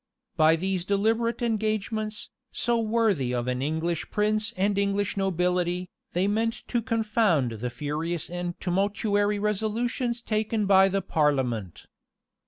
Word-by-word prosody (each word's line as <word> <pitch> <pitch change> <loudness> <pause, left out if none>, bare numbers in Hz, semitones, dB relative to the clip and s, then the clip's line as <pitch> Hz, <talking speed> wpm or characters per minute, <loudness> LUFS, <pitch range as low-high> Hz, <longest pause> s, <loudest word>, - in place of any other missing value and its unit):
[] - - -59
By 160 +1 +5
these 185 +1 -1
deliberate 225 +5 +1
engagements, 215 -1 -2 0.2
so 235 -1 +1
worthy 215 - +1
of 120 0 -2
an 125 0 -1
English 160 +3 -2
prince 215 +1 +1
and 200 +2 +1
English 200 0 0
nobility, 180 -1 0 0.2
they 180 +3 +1
meant 225 +3 0
to 240 - +1
confound 215 - +1
the 115 +2 -4
furious 150 +6 -3
and 175 0 -5
tumultuary 205 +2 +1
resolutions 225 +4 -1
taken 215 -1 0
by 195 -1 +6
the 195 0 -1
parliament. 130 - 0
200 Hz, 130 wpm, -26 LUFS, 170-215 Hz, 0.2 s, by